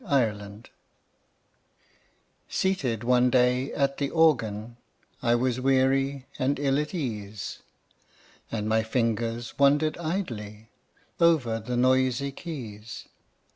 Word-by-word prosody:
VERSE: 205 - -14
A 125 -7 +3
LOST - - -11
CHORD 105 +3 -14 1.8
Seated 135 - 0
one 125 +1 +4
day 125 +1 +2
at 140 -1 0
the 140 -1 0
Organ, 115 -9 +1 0.4
I 120 0 +3
was 125 +1 0
weary 135 +1 +2
and 135 +2 +1
ill 140 0 +1
at 150 +4 -3
ease, 105 - -4 0.9
And 105 -2 -2
my 110 0 +3
fingers 115 +1 -2
wandered 145 +3 +3
idly 115 - -4 0.5
Over 145 -10 +3
the 120 +3 -3
noisy 130 +2 +2
keys. 120 -9 -8
125 Hz, 115 wpm, -27 LUFS, 115-140 Hz, 1.8 s, one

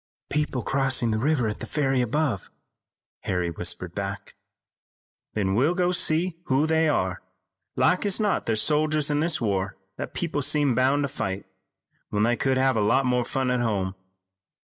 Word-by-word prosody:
"People 150 -4 -1
crossing 135 -3 +1
the 110 - 0
river 135 -2 +1
at 105 - -4
the - - -6
ferry 135 -4 +1
above," 125 - -1 0.7
Harry 90 -2 -2
whispered - - -2
back. - - -5 1.0
"Then 95 -3 0
we'll 140 - +2
go 180 -1 +2
and 180 - +1
see 165 +1 +1
who 135 +3 +2
they 160 0 +2
are. 95 -10 0 0.5
Like 155 +8 +2
as 200 - +2
not 210 -2 0
they're 115 - +2
soldiers 150 +4 +1
in 145 - +1
this 170 +1 +1
war 100 -3 -1 0.2
that - - -6
people 155 -4 -1
seem 145 -1 +2
bound 135 +4 +2
to - - 0
fight, 95 -8 -4 0.6
when 105 0 0
they 120 +2 +3
could 130 +2 +1
have 130 -1 +2
a 110 - +1
lot 120 +6 +3
more 125 -1 +2
fun 130 +1 -1
at 125 -1 +1
home. 100 -5 -1
130 Hz, 175 wpm, -25 LUFS, 110-150 Hz, 1.0 s, they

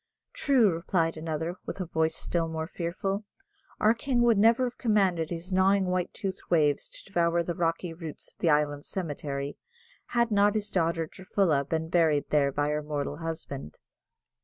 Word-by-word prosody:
"True," 265 -9 +4
replied 165 0 0
another, 160 +2 -3
with - - -5
a 185 - -2
voice 160 -1 0
still 170 -1 -1
more 160 0 -3
fearful, 190 +4 -3 0.6
"our 215 +1 +5
king 240 +1 0
would 230 -4 +4
never 230 +4 +5
have 250 -1 -3
commanded 190 -8 +2
his 175 +2 -5
gnawing 190 +1 +4
white 180 -1 -1
toothed 195 -3 -4
waves 150 -4 +2
to - - -11
devour 170 -3 +1
the 175 - -2
rocky 165 0 -1
roots 160 -2 -8
of - - -46
the 170 - +2
island 145 -1 +2
cemetery, 145 -5 -4 0.5
had 235 -1 +1
not 205 0 +4
his 210 -1 -2
daughter, 165 -2 +1
Durfulla, 175 -4 0
been 160 +2 -2
buried 160 -4 +2
there 140 -2 +3
by 145 +2 0
her 150 0 0
mortal 145 -1 -3
husband!" 160 - -6
170 Hz, 170 wpm, -28 LUFS, 155-195 Hz, 0.6 s, our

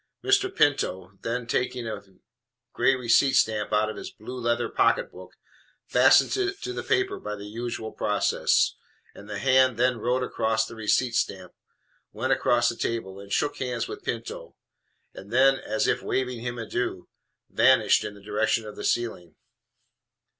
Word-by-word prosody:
Mr. 400 -1 +3
Pinto, 95 - 0
then, 120 +1 -3
taking 125 0 -2
a 105 -2 -5 0.7
gray 135 - +3
receipt 130 +2 +3
stamp 110 -4 +1
out 105 0 +2
of 110 - -6
his - - -7
blue 125 +4 -9
leather 120 0 0
pocketbook, - - 0 0.5
fastened - - +5
it 390 0 -1
on 400 - -24
to 375 - -4
the - - -4
paper 385 +1 0
by 105 - -5
the 100 0 -9
usual 115 +1 -5
process; 105 -1 +1 0.4
and 100 - -13
the 105 - -4
hand 130 0 +3
then 125 0 +2
wrote 125 +3 0
across 110 -2 0
the - - -10
receipt 115 +2 +1
stamp, 95 -5 -2 0.6
went - - 0
across 120 -1 +2
the 115 - 0
table 105 -5 -3
and 100 0 -12
shook 145 +6 0
hands 125 -3 -3
with - - -8
Pinto, - - -5 0.6
and 100 +2 -12
then, 135 +2 +4
as 135 - -1
if - - +1
waving 125 -2 -2
him 120 +1 -5
an 115 - -5
adieu, 110 -5 -3 0.4
vanished - - +4
in 105 - -6
the 100 - -16
direction 110 +2 0
of 105 - -9
the - - -8
ceiling. 110 -8 -2
120 Hz, 170 wpm, -26 LUFS, 105-130 Hz, 0.7 s, fastened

